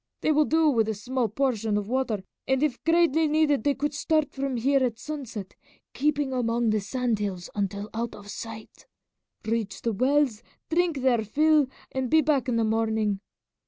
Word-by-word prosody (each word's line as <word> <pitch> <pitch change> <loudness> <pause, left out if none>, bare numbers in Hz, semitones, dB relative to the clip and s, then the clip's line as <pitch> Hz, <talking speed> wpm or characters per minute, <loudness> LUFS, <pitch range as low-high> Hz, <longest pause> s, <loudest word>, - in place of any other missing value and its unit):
They - - +2
will 305 0 +4
do 320 +1 +3
with 225 -6 +2
a 220 - -1
small 245 +3 -1
portion 225 -3 0
of 205 -1 -3
water, 240 -5 -1 0.2
and 265 +1 +2
if 280 -5 -1
greatly 330 -1 +3
needed 295 -5 +2
they 285 -1 +2
could 295 +2 -2
start 310 0 +1
from 270 -2 -2
here 270 +3 +2
at 240 -3 -1
sunset, 240 -9 -7 0.4
keeping 290 -2 0
among 235 -2 +1
the 215 - +2
sand 240 +1 -1
hills 190 -4 -4
until 200 0 -2
out 230 +1 -3
of 205 - -12
sight, 220 +1 -9 0.6
reach 220 -2 -2
the 230 - 0
wells, 255 0 +2 0.3
drink 335 -4 +1
their 240 -4 +3
fill, 300 +5 +3 0.2
and 260 -1 -2
be 315 +4 +5
back 285 -4 +1
in 240 - +1
the 230 - +2
morning. 220 -2 0
255 Hz, 180 wpm, -26 LUFS, 220-290 Hz, 0.6 s, be